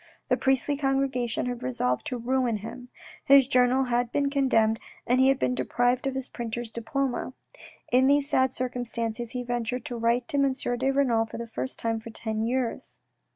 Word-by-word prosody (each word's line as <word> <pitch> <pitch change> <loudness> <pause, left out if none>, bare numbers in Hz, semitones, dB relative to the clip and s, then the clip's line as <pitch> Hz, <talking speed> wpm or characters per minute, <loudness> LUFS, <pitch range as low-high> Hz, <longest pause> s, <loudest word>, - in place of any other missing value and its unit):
The - - +4
priestly 270 +2 +1
congregation 270 -4 0
had 245 -1 -4
resolved 125 0 -1
to 250 - -2
ruin 245 -1 0
him; 245 +4 -9 0.3
his 275 -1 +7
journal 255 0 +3
had 245 -1 0
been 280 -1 +1
condemned, 225 -6 +2 0.3
and 250 +2 +2
he 260 - +5
had 270 0 +4
been 250 - 0
deprived 245 +1 0
of 270 - -2
his 265 -1 -3
printer's 235 -1 -5
diploma. 255 +3 -2 0.6
In 255 +2 +5
these 285 0 +3
sad 260 -3 +2
circumstances 240 -2 -3
he 250 -1 -3
ventured 240 0 -3
to 245 - -4
write 235 +1 +1
to 285 - -1
M. 275 -1 +3
de 245 0 -1
Renal 250 -5 +2
for - - -8
the 235 - -4
first 230 +3 -5
time 225 -1 -1
for 220 - -10
ten 220 -1 -3
years. 240 +1 -2
245 Hz, 185 wpm, -27 LUFS, 230-265 Hz, 0.6 s, his